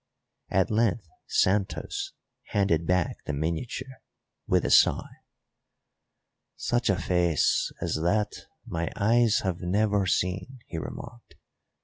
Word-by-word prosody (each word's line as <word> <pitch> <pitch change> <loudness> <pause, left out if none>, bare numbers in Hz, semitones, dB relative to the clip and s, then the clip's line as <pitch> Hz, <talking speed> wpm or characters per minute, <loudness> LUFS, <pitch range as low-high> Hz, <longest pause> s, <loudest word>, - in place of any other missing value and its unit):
At - - +2
length 110 -3 +1 0.2
Santos 105 - 0 0.3
handed 85 -6 +1
back 90 -2 +1
the 75 - -1
miniature, 85 - -4 0.5
with - - +2
a - - 0
sigh. - - +4 1.4
"Such 120 -2 0
a 95 - +4
face 90 -3 +1
as - - -1
that 105 +6 +1 0.3
my 85 0 -2
eyes 115 +2 +3
have 95 -3 -2
never 100 +2 +1
seen," 95 +8 -1
he 80 - -5
remarked. 120 +7 -9
95 Hz, 110 wpm, -27 LUFS, 85-110 Hz, 1.4 s, sigh